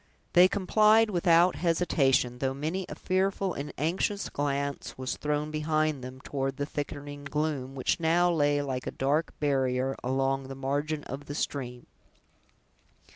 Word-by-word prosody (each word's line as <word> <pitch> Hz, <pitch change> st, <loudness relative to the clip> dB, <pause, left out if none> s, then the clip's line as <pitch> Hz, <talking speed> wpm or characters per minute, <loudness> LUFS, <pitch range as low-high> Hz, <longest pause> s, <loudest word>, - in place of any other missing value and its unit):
They 180 Hz, +1 st, +8 dB
complied 215 Hz, +3 st, +4 dB
without 175 Hz, -1 st, +4 dB
hesitation, 135 Hz, -8 st, +2 dB
though 135 Hz, 0 st, -1 dB
many 165 Hz, +7 st, -3 dB
a -, -, -6 dB
fearful 190 Hz, 0 st, 0 dB
and 140 Hz, +1 st, -5 dB
anxious 185 Hz, +6 st, -1 dB
glance 140 Hz, -1 st, -2 dB
was 130 Hz, 0 st, -3 dB
thrown 150 Hz, 0 st, -2 dB
behind 155 Hz, -2 st, 0 dB
them, 130 Hz, +1 st, -8 dB
toward 135 Hz, -1 st, -3 dB
the 145 Hz, -, -1 dB
thickening 145 Hz, 0 st, -6 dB
gloom, 145 Hz, -3 st, -2 dB
which 130 Hz, -, 0 dB
now 170 Hz, +2 st, +3 dB
lay 145 Hz, -3 st, +2 dB
like 130 Hz, -2 st, -4 dB
a -, -, -2 dB
dark 145 Hz, +5 st, 0 dB
barrier 135 Hz, -2 st, +1 dB
along 135 Hz, +1 st, 0 dB
the 135 Hz, -, -7 dB
margin 145 Hz, +3 st, -2 dB
of 140 Hz, +1 st, -7 dB
the 145 Hz, -, -6 dB
stream. 125 Hz, -5 st, -4 dB
145 Hz, 145 wpm, -28 LUFS, 135-165 Hz, -, They